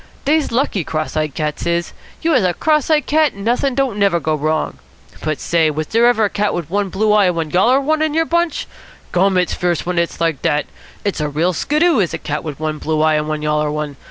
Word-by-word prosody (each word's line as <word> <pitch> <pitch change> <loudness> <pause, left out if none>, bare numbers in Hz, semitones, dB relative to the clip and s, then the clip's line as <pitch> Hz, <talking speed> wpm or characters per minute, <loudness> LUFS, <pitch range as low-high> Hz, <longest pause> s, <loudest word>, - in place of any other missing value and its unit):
"Dey's 305 +1 +2
lucky, 230 - 0
cross 155 0 -3
eyed 155 -2 -1
cats 150 +1 -3
is. 170 0 -1 0.3
You 330 - +2
has 255 -9 +3
a 180 -2 +1
cross 305 -2 +1
eyed 300 -3 +3
cat, 305 -3 +2
and 200 +1 -9
not'in' 250 +3 +1
don't 260 -6 0
never 195 -4 +3
go 155 0 -1
wrong. 155 +1 -1 0.4
But, 155 -1 -2
say, 165 -2 +2
was 155 +1 -2
dere 230 +6 +3
ever 240 -2 +3
a - - 0
cat 210 0 0
wit 165 -2 -5
one 200 0 0
blue 210 +3 +1
eye 210 -2 +5
and 180 -2 +1
one 160 -2 -3
yaller 235 - +4
one 310 +3 0
in 310 -1 0
your 325 0 +2
bunch? 340 -1 0 0.5
Gum, 190 +1 +2
it's 180 -1 +1
fierce 175 -2 -1
when 180 -1 0
it's 170 - -2
like 165 -4 0
dat. 150 0 +1 0.4
It's 200 -6 -1
a 150 - -1
real 165 +5 0
skiddoo, 305 - +2
is 185 -5 0
a - - -3
cat 150 0 -4
wit 150 -3 -6
one 155 -1 -3
blue 155 -1 -1
eye 155 0 +3
and 150 0 0
one 155 -1 -3
yaller 150 0 +1
one. 150 -1 -4
180 Hz, 245 wpm, -18 LUFS, 155-245 Hz, 0.5 s, eye